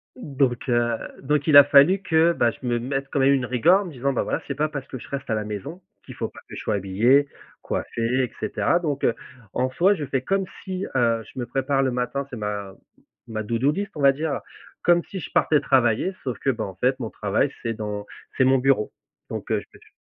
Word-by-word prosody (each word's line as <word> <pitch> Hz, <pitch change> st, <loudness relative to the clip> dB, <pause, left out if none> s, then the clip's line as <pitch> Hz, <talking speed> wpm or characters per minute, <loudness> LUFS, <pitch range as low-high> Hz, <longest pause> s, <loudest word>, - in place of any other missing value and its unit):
donc 135 Hz, -, -1 dB
heu, 120 Hz, -1 st, +2 dB, 0.2 s
donc 145 Hz, +1 st, 0 dB
il 150 Hz, -2 st, +8 dB
a 145 Hz, -, +12 dB
fallu 145 Hz, +7 st, +6 dB
que, 165 Hz, -2 st, +3 dB
bah, 120 Hz, -, +2 dB
je 130 Hz, -, -12 dB
me 120 Hz, -1 st, 0 dB
mette 135 Hz, +3 st, -3 dB
quand -, -, 0 dB
même 135 Hz, +1 st, +5 dB
une 130 Hz, -2 st, +1 dB
rigueur 145 Hz, -, +4 dB
en -, -, -5 dB
me 175 Hz, -, -7 dB
disant: 140 Hz, 0 st, -1 dB
«Bah, -, -, 0 dB
voilà, -, -, -2 dB
c'est -, -, -3 dB
pas 155 Hz, +1 st, 0 dB
parce 140 Hz, -3 st, -6 dB
que 130 Hz, -, -7 dB
je -, -, -12 dB
reste 140 Hz, -2 st, -5 dB
à 110 Hz, -, +1 dB
la 110 Hz, -, -2 dB
maison 105 Hz, -, -6 dB, 0.2 s
qu'il -, -, -10 dB
faut -, -, -3 dB
pas -, -, -14 dB
que -, -, -10 dB
je -, -, -6 dB
sois -, -, -1 dB
habillé, 110 Hz, +9 st, +3 dB, 0.3 s
coiffé 115 Hz, -, -4 dB, 0.2 s
et 125 Hz, -, -3 dB
cetera» 175 Hz, -, +1 dB
donc 150 Hz, -5 st, -3 dB
heu, 120 Hz, -, +3 dB, 0.4 s
en 130 Hz, +1 st, 0 dB
soi, 180 Hz, +9 st, +4 dB
je 155 Hz, -6 st, -4 dB
fais 135 Hz, -1 st, -1 dB
comme 195 Hz, +7 st, 0 dB, 0.2 s
si, 190 Hz, 0 st, -4 dB
heu, 115 Hz, -3 st, +2 dB
je -, -, -18 dB
me 120 Hz, -, -2 dB
prépare 135 Hz, +2 st, 0 dB
le 130 Hz, -, +1 dB
matin, 125 Hz, +3 st, -2 dB
c'est 125 Hz, -, -7 dB
ma 105 Hz, -2 st, -4 dB, 0.5 s
ma 110 Hz, -1 st, -4 dB
to 115 Hz, +2 st, -1 dB
do 135 Hz, +5 st, +2 dB
list, 200 Hz, +6 st, -4 dB
on 150 Hz, -, -5 dB
va 140 Hz, -1 st, +7 dB
dire, 150 Hz, +1 st, -2 dB
heu, -, -, -4 dB, 0.4 s
comme 175 Hz, 0 st, +4 dB
si 190 Hz, -, -5 dB
je -, -, -7 dB
partais 150 Hz, -, +3 dB
travailler, 130 Hz, -, +2 dB
sauf 125 Hz, -3 st, -3 dB
que -, -, 0 dB
ben, 115 Hz, -3 st, -4 dB
en 95 Hz, -, -8 dB
fait, 130 Hz, +6 st, +1 dB
mon 115 Hz, -3 st, -4 dB
travail 105 Hz, +8 st, 0 dB
c'est 115 Hz, -1 st, -2 dB
dans 105 Hz, -1 st, -5 dB, 0.3 s
c'est 130 Hz, -, +4 dB
mon 130 Hz, 0 st, +4 dB
bureau 130 Hz, -4 st, +1 dB, 0.4 s
donc -, -, -6 dB
heu, -, -, +2 dB
je -, -, -12 dB
p -, -, -17 dB
j -, -, -21 dB
135 Hz, 255 wpm, -24 LUFS, 115-150 Hz, 0.5 s, a